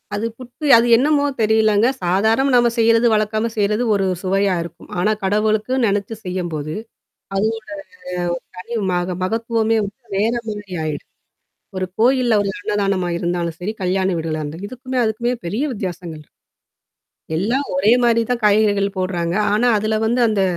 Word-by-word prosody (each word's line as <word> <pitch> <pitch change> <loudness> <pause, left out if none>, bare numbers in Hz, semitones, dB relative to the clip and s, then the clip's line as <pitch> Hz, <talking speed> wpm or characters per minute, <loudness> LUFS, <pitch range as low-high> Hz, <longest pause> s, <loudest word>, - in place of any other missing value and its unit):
அது 210 +2 -2
புட்டு 255 +4 -9
அது 230 +1 +3
என்னமோ 285 +3 +2 0.2
தெரியலங்க. 220 0 +3 0.2
சாதாரணமா 220 +9 +2
நம்ம 240 -1 +5
செய்றது 230 +1 +4
வழக்கமா 215 +1 0
செய்றது 210 +3 +1
ஒரு 195 -1 +1 0.2
சுவையா 195 0 +1
இருக்கும். 170 - -12
ஆனா 210 +5 +2
கடவுளுக்கு 215 +4 +1
நெனச்சு 205 +1 -1
செய்யும்போது, 170 -5 -3 0.6
அதோட 210 +3 +1
ஒரு 215 - -27 0.9
தனி 230 +6 -6 0.2
மக 180 0 -1
மகத்துவமே 225 +2 0
வந்துட்டு 215 +5 -9
வேற 220 +4 +2 0.2
மாரி 205 -3 -7
ஆயிடும். 155 -2 -5 0.7
ஒரு 185 0 -1
கோயில்ல, 245 0 +3
ஒரு 200 - -1
அன்னதானமா 200 -2 0
இருந்தாலும் 170 -1 -2
சரி, 195 +4 -3
கல்யாண 185 +1 +1
வீடுகள்னா 160 -1 -3
இருந்து 160 +6 -7
இதுக்குமே, 255 +2 -6
அதுக்குமே 230 +2 0
பெரிய 210 +10 -2
வித்தியாசங்கள் 175 -6 -6 0.9
இரு 160 - -10
எல்லாம் 235 - 0
ஒரே 200 +5 +4
மாரி 235 -1 +4
தான் 245 -1 0
காய்கறிகள் 205 -1 +3
போடுறாங்க. 175 -2 -1 0.2
ஆனா, 215 +4 +2
அதில 215 +1 0
வந்து 240 +3 +1
அந்த 210 -3 +1
210 Hz, 145 wpm, -20 LUFS, 185-230 Hz, 0.9 s, நம்ம